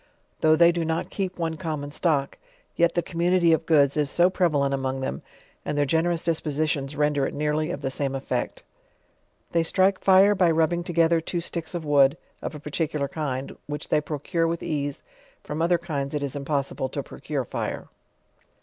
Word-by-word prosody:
Though 155 Hz, 0 st, +5 dB
they 170 Hz, +1 st, +6 dB
do 170 Hz, -1 st, -2 dB
not 160 Hz, 0 st, -2 dB
keep 190 Hz, -2 st, -3 dB
one 165 Hz, -2 st, -2 dB
common 150 Hz, -3 st, -4 dB
stock, 145 Hz, -3 st, 0 dB, 0.4 s
yet 170 Hz, 0 st, +2 dB
the 175 Hz, -, +1 dB
community 175 Hz, 0 st, +2 dB
of 160 Hz, 0 st, 0 dB
goods 145 Hz, -4 st, +4 dB
is 150 Hz, -2 st, +1 dB
so 175 Hz, +4 st, +3 dB
prevalent 145 Hz, -7 st, +1 dB
among 135 Hz, 0 st, -2 dB
them, 100 Hz, -, -3 dB, 0.4 s
and 145 Hz, -, -3 dB
their 145 Hz, -, +3 dB
generous 165 Hz, +3 st, +1 dB
dispositions 150 Hz, -3 st, -1 dB
render 150 Hz, -2 st, +1 dB
it -, -, -6 dB
nearly 150 Hz, +1 st, 0 dB
of 160 Hz, -5 st, -4 dB
the 135 Hz, -2 st, -2 dB
same 135 Hz, 0 st, -2 dB
effect. 130 Hz, -2 st, -3 dB, 0.9 s
They 170 Hz, -, +2 dB
strike 190 Hz, +3 st, +2 dB
fire 195 Hz, +2 st, +6 dB
by 185 Hz, -3 st, +3 dB
rubbing 165 Hz, +2 st, +2 dB
together 170 Hz, -1 st, +2 dB
two 175 Hz, +2 st, -3 dB
sticks 170 Hz, 0 st, -5 dB
of 170 Hz, -2 st, -4 dB
wood, 145 Hz, 0 st, +4 dB, 0.2 s
of -, -, -5 dB
a -, -, -7 dB
particular 150 Hz, -1 st, -2 dB
kind, 140 Hz, -2 st, -4 dB
which 150 Hz, 0 st, -5 dB
they 150 Hz, -, +3 dB
procur 160 Hz, +3 st, -1 dB
e -, -, 0 dB
with 170 Hz, 0 st, -3 dB
ease; 145 Hz, -2 st, -3 dB, 0.4 s
from 150 Hz, +2 st, -4 dB
oth 170 Hz, +2 st, +1 dB
er 175 Hz, -, +5 dB
kinda 150 Hz, -4 st, -4 dB
it 145 Hz, -, -1 dB
is 140 Hz, -1 st, -4 dB
impossible 140 Hz, -2 st, -2 dB
to 140 Hz, +1 st, -4 dB
procure 140 Hz, 0 st, -4 dB
fire. -, -, -4 dB
155 Hz, 190 wpm, -25 LUFS, 140-170 Hz, 0.9 s, they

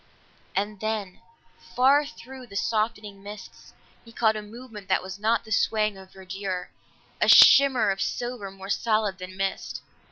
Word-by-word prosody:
And 205 Hz, +1 st, -2 dB
then 215 Hz, -3 st, -4 dB, 0.6 s
far 275 Hz, +4 st, +4 dB
through 260 Hz, -2 st, -12 dB
the 200 Hz, -, -13 dB
softening 210 Hz, 0 st, -2 dB
mists, 205 Hz, +1 st, -11 dB, 0.3 s
he 230 Hz, -, -15 dB
caught 220 Hz, -1 st, +1 dB
a 215 Hz, -, -4 dB
movement 215 Hz, -1 st, -11 dB
that 190 Hz, -, +1 dB
was 190 Hz, +1 st, -8 dB
not 225 Hz, +2 st, +1 dB
the 220 Hz, -, -13 dB
swaying 215 Hz, -1 st, +1 dB
of 190 Hz, -1 st, -14 dB
verdure, 190 Hz, -1 st, -6 dB, 0.5 s
a -, -, +3 dB
shimmer 255 Hz, -7 st, +7 dB
of 195 Hz, 0 st, -4 dB
silver 240 Hz, -5 st, -3 dB
more 195 Hz, 0 st, -11 dB
solid 215 Hz, -4 st, 0 dB
than 185 Hz, +1 st, -9 dB
mist. 195 Hz, 0 st, -3 dB
210 Hz, 155 wpm, -25 LUFS, 195-230 Hz, 0.6 s, shimmer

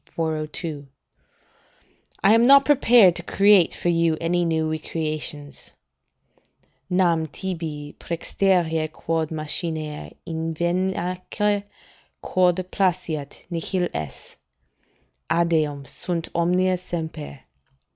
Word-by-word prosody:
402.] 155 Hz, -2 st, -3 dB, 1.4 s
"I 200 Hz, -, +6 dB
am 230 Hz, +2 st, +5 dB
not 275 Hz, 0 st, +8 dB
prepared 240 Hz, -10 st, +6 dB
to -, -, -3 dB
create 195 Hz, 0 st, +4 dB
for 175 Hz, -, -1 dB
you 165 Hz, -2 st, +2 dB
any 175 Hz, +1 st, +1 dB
new 160 Hz, -1 st, 0 dB
recreations: 155 Hz, -2 st, -5 dB, 1.2 s
"'Nam 170 Hz, -3 st, +2 dB
tibi 155 Hz, -3 st, -5 dB
prxterea 165 Hz, -2 st, 0 dB
quod 160 Hz, -1 st, -2 dB
machiner, 155 Hz, -1 st, -2 dB, 0.2 s
inveniamque 180 Hz, +5 st, -1 dB, 0.5 s
Quod 180 Hz, -1 st, +2 dB, 0.2 s
placeat, 175 Hz, -6 st, -1 dB
nihil 175 Hz, +2 st, -1 dB
est; 75 Hz, -3 st, -7 dB, 0.9 s
eadem 155 Hz, -4 st, +1 dB
sunt 170 Hz, +2 st, -3 dB
omnia 180 Hz, +2 st, +2 dB
semper. 160 Hz, -5 st, -6 dB
165 Hz, 85 wpm, -23 LUFS, 155-185 Hz, 1.4 s, not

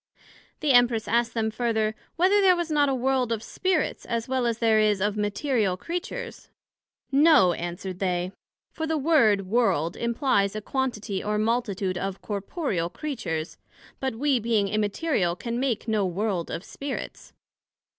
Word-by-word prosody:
The 300 Hz, -2 st, +2 dB
Empress 245 Hz, -3 st, +4 dB
asked 235 Hz, 0 st, +1 dB
them 220 Hz, -1 st, 0 dB
further, 220 Hz, -2 st, 0 dB, 0.2 s
Whether 380 Hz, +4 st, +4 dB
there 375 Hz, -2 st, +6 dB
was 345 Hz, -2 st, -3 dB
not 290 Hz, -2 st, +3 dB
a 270 Hz, -, +1 dB
World 255 Hz, -1 st, 0 dB
of 225 Hz, -1 st, -2 dB
Spirits, 370 Hz, +2 st, -1 dB
as 230 Hz, -1 st, -2 dB
well 260 Hz, -2 st, 0 dB
as 230 Hz, -1 st, 0 dB
there 225 Hz, -2 st, +3 dB
is 210 Hz, -2 st, +3 dB
of 205 Hz, +1 st, 0 dB
Material 210 Hz, -1 st, 0 dB
Creatures? 370 Hz, -, -6 dB, 0.6 s
No, 280 Hz, -, +6 dB
answered 175 Hz, +2 st, -5 dB
they; 180 Hz, -1 st, -1 dB, 0.4 s
for 320 Hz, -, -4 dB
the 320 Hz, 0 st, 0 dB
word 260 Hz, -, +3 dB
World 185 Hz, -7 st, +1 dB
implies 235 Hz, -4 st, +1 dB
a -, -, -2 dB
quantity 215 Hz, -6 st, -2 dB
or 210 Hz, 0 st, -1 dB
multitude 210 Hz, -5 st, -1 dB
of 195 Hz, 0 st, -4 dB
corporeal 200 Hz, -, -2 dB
Creatures, 180 Hz, -, -4 dB, 0.4 s
but 265 Hz, -3 st, -2 dB
we 270 Hz, +1 st, +2 dB
being 220 Hz, -3 st, +1 dB
Immaterial, 210 Hz, -, 0 dB
can 235 Hz, +4 st, -4 dB
make 255 Hz, -4 st, -1 dB
no 215 Hz, -2 st, +1 dB
World 185 Hz, -1 st, -2 dB
of 170 Hz, -, -4 dB
Spirits. 275 Hz, +5 st, -7 dB
225 Hz, 155 wpm, -26 LUFS, 200-270 Hz, 0.6 s, there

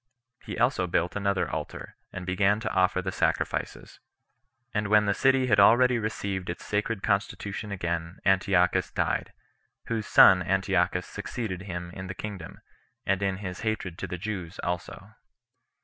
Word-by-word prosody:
He 105 Hz, -, -6 dB
also 120 Hz, -6 st, +2 dB
built 85 Hz, 0 st, 0 dB
another 100 Hz, -1 st, 0 dB
altar, -, -, -6 dB, 0.2 s
and 90 Hz, -1 st, -7 dB
began 100 Hz, +3 st, +2 dB
to -, -, -3 dB
offer 95 Hz, 0 st, +2 dB
the 95 Hz, -, -2 dB
sacrifices; -, -, -2 dB, 0.7 s
and 105 Hz, -1 st, 0 dB
when 105 Hz, 0 st, +4 dB
the 100 Hz, -, +2 dB
city 135 Hz, +3 st, +3 dB
had 105 Hz, -5 st, +3 dB
already 120 Hz, +4 st, +6 dB
received 100 Hz, -4 st, -3 dB
its 85 Hz, -, -6 dB
sacred 105 Hz, 0 st, -2 dB
constitution 100 Hz, +1 st, -2 dB
again, 85 Hz, -2 st, -3 dB
Antiochus 95 Hz, -2 st, +3 dB
died; -, -, -1 dB, 0.6 s
whose 110 Hz, -2 st, -2 dB
son 95 Hz, -1 st, +7 dB
Antiochus 90 Hz, -1 st, +1 dB
succeeded 105 Hz, -3 st, -5 dB
him 90 Hz, -3 st, -6 dB
in 95 Hz, +1 st, -7 dB
the 95 Hz, -, -6 dB
kingdom, 100 Hz, -5 st, -7 dB, 0.4 s
and 95 Hz, 0 st, +1 dB
in 95 Hz, -1 st, 0 dB
his 90 Hz, 0 st, -5 dB
hatred 110 Hz, -6 st, -3 dB
to -, -, -4 dB
the 90 Hz, -, -5 dB
Jews 90 Hz, -3 st, -5 dB
also. 90 Hz, +3 st, -5 dB
95 Hz, 150 wpm, -27 LUFS, 90-105 Hz, 0.7 s, son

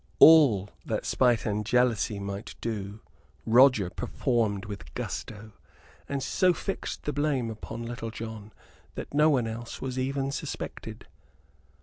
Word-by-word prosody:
All 130 Hz, -12 st, +7 dB
that -, -, -3 dB
spite 120 Hz, -3 st, +2 dB
and 105 Hz, 0 st, -1 dB
jealousy 115 Hz, -2 st, +1 dB
might 100 Hz, +1 st, -6 dB
do 105 Hz, -2 st, -5 dB, 0.4 s
Roger 115 Hz, -5 st, +5 dB
performed 110 Hz, -6 st, -1 dB
with 100 Hz, -10 st, -8 dB
gusto, 105 Hz, +1 st, -6 dB, 0.6 s
and 140 Hz, -2 st, -2 dB
so 185 Hz, -2 st, +3 dB
fixed 195 Hz, +2 st, -5 dB
the 150 Hz, -, -2 dB
blame 140 Hz, -6 st, 0 dB
upon 115 Hz, +1 st, -7 dB
Little 115 Hz, -1 st, -5 dB
John 110 Hz, -1 st, -8 dB, 0.4 s
that -, -, -7 dB
no 150 Hz, +2 st, +5 dB
one 130 Hz, -6 st, +2 dB
else 115 Hz, +1 st, -6 dB
was 130 Hz, -1 st, -4 dB
even 135 Hz, +1 st, -1 dB
suspected. -, -, -6 dB
115 Hz, 130 wpm, -28 LUFS, 105-135 Hz, 0.6 s, All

